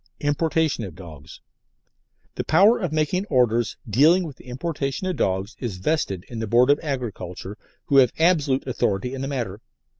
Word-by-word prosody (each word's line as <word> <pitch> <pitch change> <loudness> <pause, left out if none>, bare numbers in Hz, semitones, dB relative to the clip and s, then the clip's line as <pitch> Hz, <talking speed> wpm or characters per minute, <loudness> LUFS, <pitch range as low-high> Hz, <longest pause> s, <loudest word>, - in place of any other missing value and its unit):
IMPORTATION 155 -2 0
OF 95 -6 -7
DOGS 80 -4 -12 0.9
The - - -3
power 200 +9 +5
of 180 -7 -2
making 155 +6 0
Orders 120 - +1
dealing 155 - +4
with 155 -6 -7
the - - -17
importation 140 +3 -3
of 185 -1 -1
dogs 95 +4 -1
is 115 -7 -4
vested 95 - -1
in 115 - -7
the 110 - -3
Board 120 +5 +4
of 145 - +3
Agriculture, 105 - -5 0.3
who 140 - +2
have 130 -3 +6
absolute 155 -6 +2
authority 125 -2 -1
in 135 - -5
the 135 - -3
matter. 115 -7 -4
130 Hz, 170 wpm, -23 LUFS, 105-155 Hz, 0.9 s, have